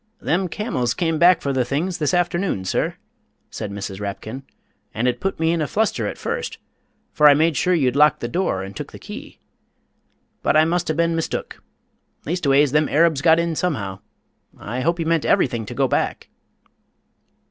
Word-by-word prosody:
"Them 185 +3 0
camels 185 - -2
come 165 -3 0
back 175 +1 +6
for 140 - -1
the 130 -1 +1
things 155 +9 -2
this 150 - +1
afternoon, 175 - 0
sir," - - -1 0.6
said 105 - -5
Mrs. 100 -1 -6
Rapkin, 105 +5 -6 0.5
"and 120 +3 0
it 125 -1 0
put 195 -3 -3
me 165 0 +2
in 170 -1 0
a 150 - 0
fluster 200 - 0
at - - -5
first, - - -4 0.6
for 150 - +6
I 145 - +6
made 160 +1 +2
sure 180 +5 +2
you'd 130 -6 +1
locked 150 -2 +4
your 120 - -3
door 170 - -1
and 95 0 -9
took - - -7
the - - -8
key. - - -10 1.0
But - - +2
I 155 - +5
must 175 +1 0
have 155 - -1
been 170 0 +2
mistook 165 - -4 0.6
leastways, 145 -4 +2
them 150 +1 +2
Arabs 160 -2 +3
got 160 +2 +5
in 170 -1 0
somehow. 105 - -2 0.6
I 120 +5 -5
hope 170 +5 0
you 165 - -1
meant 165 -1 +1
everything 115 -5 +1
to - - -7
go - - +2
back?" - - -2
155 Hz, 185 wpm, -21 LUFS, 125-170 Hz, 1.0 s, back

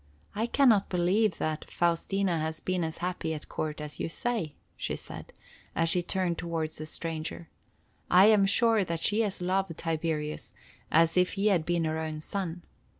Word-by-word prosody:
"I 220 +3 -1
can 275 +2 +4
not 205 -4 +3
believe 185 +3 +2
that 155 0 -3
Faustina 175 +1 +1
has 160 0 -2
been 185 -1 -1
as 160 0 -3
happy 175 -3 -2
at 150 - -8
court 155 -1 -3
as 150 -1 -6
you - - -2
say," 210 -5 -2 0.2
she - - -3
said, - - -9 0.4
as 165 0 +2
she 180 - +3
turned 175 -1 -1
toward 165 -2 -2
the 155 0 -7
stranger. 165 +1 -5 0.6
"I 185 +2 +7
am 210 -2 +6
sure 225 +1 +4
that 170 -2 -3
she 210 +2 +3
has 205 -4 -2
loved 185 -2 0
Tiberius 160 -2 -2 0.4
as 165 +2 +4
if 180 0 +3
he 200 +2 +2
had 170 -3 0
been 170 -1 +1
her 160 0 -1
own 155 -1 -4
son. 175 0 -3
170 Hz, 180 wpm, -29 LUFS, 160-195 Hz, 0.6 s, I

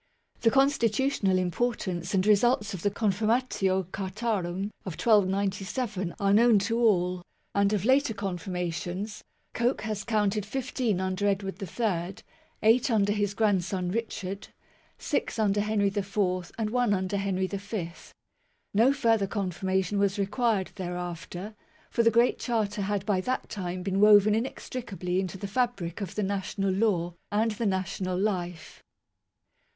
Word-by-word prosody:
The 230 - +4
con 270 +3 +5
stitutional 230 -5 +1
importance 185 -1 -1
and 185 0 +2
results 210 0 +3
of 185 - -5
the 205 - +2
"Confirmatio 205 -3 0
Cartarum" 195 -1 -2
of 185 - -5
1297 200 -1 +1
are 200 0 +3
known 230 +1 +6
to 225 +4 0
all; 180 -6 +2 0.3
and 200 0 +3
of 205 -2 0
later 265 -2 +3
confirmations, 180 +1 -4 0.3
Coke 240 +3 0
has 215 -2 -3
counted 210 -2 +1
fifteen 240 -2 -1
under 190 +2 -1
Edward 195 0 -2
III, 190 -2 -2 0.5
eight 235 +5 +4
under 205 -3 +2
his 205 -1 -1
grandson 190 -4 +1
Richard, 200 -3 -4 0.5
six - - -2
under 205 -2 +2
Henry 210 -1 +1
IV, 195 -3 -1
and 215 -2 -1
one 245 -4 +2
under 190 +1 -1
Henry 195 -1 0
V. 200 -2 -4 0.8
No 235 +7 +5
further 225 -7 +2
confirmation 190 0 -1
was 200 0 +1
required 205 0 0
thereafter, 180 +2 -5 0.4
for 235 - +2
the 230 - +5
Great 235 +2 +3
Charter 215 -4 -1
had 200 0 -1
by 195 -4 +1
that 255 +6 -2
time 180 -2 -4
been 195 0 -1
woven 210 0 +7
inextricably 220 -5 -3
into 190 0 -3
the 200 - -6
fabric 210 -6 -1
of 195 - -5
the 210 - 0
national 195 0 -1
law 185 -4 +1 0.2
and 220 +2 +2
the 215 +1 -2
national 185 -1 -1
life. 180 -4 -3
200 Hz, 140 wpm, -28 LUFS, 185-220 Hz, 0.8 s, woven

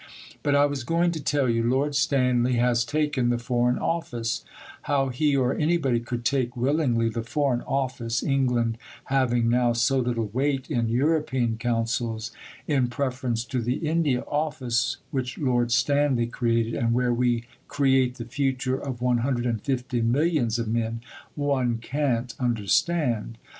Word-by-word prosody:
But 145 -1 +1
I 145 0 +5
was 145 -3 -2
going 170 +6 +1
to 160 -3 -5
tell 140 -2 +1
you: 115 -1 +1
Lord 135 +5 +1
Stanley 125 -3 +2
has 120 0 +2
taken 145 -2 0
the 120 - +1
Foreign 120 +1 +1
Office 120 -9 -2 0.5
(how 135 -2 +2
he 140 +3 +1
or 130 0 +2
anybody 150 -6 +1
could 120 0 -5
take 125 -2 0
willingly 125 -3 +1
the 115 +1 -2
Foreign 125 +1 0
Office, 125 -4 -1
England 125 -4 +1 0.3
having 120 -3 +2
now 120 0 +3
so 130 +3 +2
little 120 -2 -1
weight 135 +1 -1
in 115 -2 0
European 130 -2 +1
councils, 115 -1 -1 0.3
in 135 -5 +1
preference 125 -2 -2
to 130 -2 -2
the 120 +3 -1
India 155 -5 0
Office 130 -6 -1
which 130 -1 -3
Lord 120 -4 +1
Stanley 135 0 +2
created 115 -1 0
and 115 0 0
where 125 -1 +2
we 120 -1 +1 0.2
create 130 -3 +2
the 120 - -7
future 130 0 -1
of 125 -3 -5
150 125 0 0
millions 125 -1 +1
of 115 -1 -2
men, 115 0 -1 0.3
one 135 -5 0
can't 125 -1 -1
understand). 120 - 0
125 Hz, 145 wpm, -25 LUFS, 120-140 Hz, 0.5 s, I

